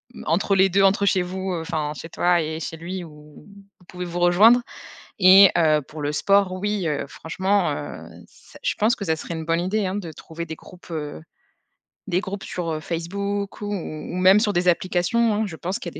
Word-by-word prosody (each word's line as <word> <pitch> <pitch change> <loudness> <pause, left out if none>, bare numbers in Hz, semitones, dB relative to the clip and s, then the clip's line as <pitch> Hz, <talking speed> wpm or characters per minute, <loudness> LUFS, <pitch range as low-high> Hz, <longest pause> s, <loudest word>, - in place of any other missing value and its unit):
m - - -9
entre 190 +5 +1
les 190 0 +5
2 195 +2 +3
entre 195 +1 +3
chez 190 -2 +3
vous. 185 +1 -4
Heu, 165 - -3
enfin 155 -2 -3
chez 165 - -9
toi 175 +1 +2
et 160 0 -4
chez 165 - -5
lui 175 +2 -6
où 150 -1 -15 0.3
vous 180 - -22
pouvez 180 0 -7
vous 175 0 -5
rejoindre 210 +8 +6 0.6
et 190 +1 +8
heu, 155 -3 +3
pour 155 0 -9
le 145 0 -1
sport 195 +4 +3
oui, 195 -1 -2
heu, 150 -2 -2
franchement, 190 +6 -1
heu, - - -6 0.2
ç - - -21
je - - +1
pense 220 +3 +2
que 200 - -6
ça 160 - +1
serait 165 +1 -6
une 160 -1 -5
bonne 165 +1 +1
idée 200 +3 -1
hein 185 - -2
de 175 -6 -5
trouver 165 +2 -8
des 160 - -6
groupes, 180 +3 -16
heu, 155 -1 -5 0.9
des 180 -1 +1
groupes 200 0 -6
sur, 170 -2 -4
heu, 155 - -3
Facebook 200 +6 -4
ou - - -4
ou 160 -4 -6
ou - - -4
même 185 +2 +6
sur 210 -2 +1
des 180 0 0
applications, 185 +6 +2
hein, 220 - 0
je 175 - -7
pense 180 +4 -4
qu'il 175 - -6
y - - -16
a - - -9
180 Hz, 230 wpm, -23 LUFS, 160-195 Hz, 0.9 s, et